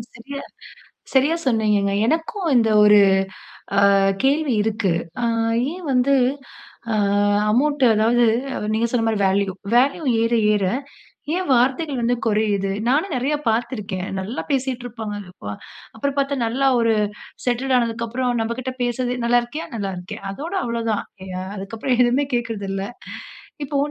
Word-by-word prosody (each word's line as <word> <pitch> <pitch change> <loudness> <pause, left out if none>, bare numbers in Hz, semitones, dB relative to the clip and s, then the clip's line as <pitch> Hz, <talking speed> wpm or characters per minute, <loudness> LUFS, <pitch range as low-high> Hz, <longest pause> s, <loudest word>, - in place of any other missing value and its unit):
சரியா 275 +5 -7 0.7
சரியா 280 +5 +4
சொன்னீங்கங்க. 210 -4 +2
எனக்கும் 330 - -1
இந்த 225 -2 +3 0.2
ஒரு 210 0 +7 0.8
அ - - +6 0.4
கேள்வி 280 0 +2
இருக்கு. 215 -3 0 0.3
ஆ. - - +2 0.5
ஏன் 365 0 -9
வந்து. 255 +2 +3 0.8
ஆ - - +1 0.6
அமவுண்ட் 285 +5 +1
அதாவது 230 +3 +3 0.3
அவ - - -4
நீங்க 225 +2 +1
சொன்ன 230 -2 +1
மாரி 220 -2 +1
வேல்யூ 195 0 +1 0.2
வேல்யூ 270 +6 +3 0.2
ஏற, 230 +1 +1 0.2
ஏற, 205 -2 0 0.7
ஏன் 370 +1 -1
வார்த்தைகள் 265 +3 +2
வந்து 240 +1 +2
குறையுது? 210 -3 +1 0.2
நானும் 300 +10 +1
நிறைய 265 +4 0
பார்த்து 235 +2 0
இருக்கேன். 195 -3 -4
நல்லா 210 +8 -4
பேசிட்ருப்பாங்க, 245 -5 -3 0.2
இப்ப. 105 - -8 0.4
அப்புறம் 280 +5 -2
பார்த்தா 280 0 +1
நல்லா 260 +4 +1
ஒரு 230 -1 +3 0.5
செட்டெட் 255 +2 0
ஆனதுக்கு 230 -1 -1
அப்புறம் 250 +2 -1
நம்மகிட்ட 235 +3 -3
பேசுறதே. 245 +1 -1
"நல்லா 240 +1 +4
இருக்கியா? 295 +7 -6
நல்லா 200 -3 -3
இருக்கேன்" 200 +4 -8
அதோட 305 - -6
அவ்வளவு 235 -1 -3
தான். 210 - -1 0.3
யா 185 0 -4 0.2
அதுக்கபுறம் 225 +6 -2
எதுவுமே 250 +4 +2
கேட்கறதில்ல. 205 -5 -2 0.8
இப்போ 285 +1 -3
240 Hz, 140 wpm, -21 LUFS, 215-265 Hz, 0.8 s, ஒரு